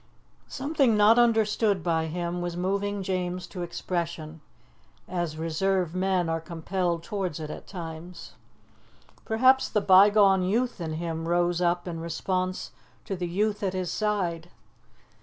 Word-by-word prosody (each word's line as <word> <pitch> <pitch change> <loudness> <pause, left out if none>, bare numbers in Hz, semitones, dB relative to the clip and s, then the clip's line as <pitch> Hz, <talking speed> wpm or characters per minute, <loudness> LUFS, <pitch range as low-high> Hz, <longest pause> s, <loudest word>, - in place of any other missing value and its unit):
Something 275 -5 +1
not 215 +3 +6
understood 220 -4 +2
by 165 -2 0
him 175 +2 -3
was 175 0 -4
moving 200 +2 -1
James 180 -1 -2
to 180 - -8
expression, 170 -2 -4 0.7
as 175 -4 -3
reserved 170 +2 0
men 185 -1 +1
are 165 0 -1
compelled 170 +1 -2
towards 190 -6 -3
it 155 -1 -5
at - - -9
times. 165 - -8 0.9
Perhaps 260 +4 +4
the 210 - +1
bygone 195 0 +6
youth 225 +3 0
in 160 -2 -3
him 165 0 -4
rose 175 0 +1
up 175 0 +1
in 165 -2 -4
response 185 +3 -2 0.3
to 195 - -3
the 175 -1 -3
youth 205 +4 -1
at 190 -2 -1
his 185 -2 -2
side. 180 -6 -1
180 Hz, 140 wpm, -27 LUFS, 170-200 Hz, 0.9 s, not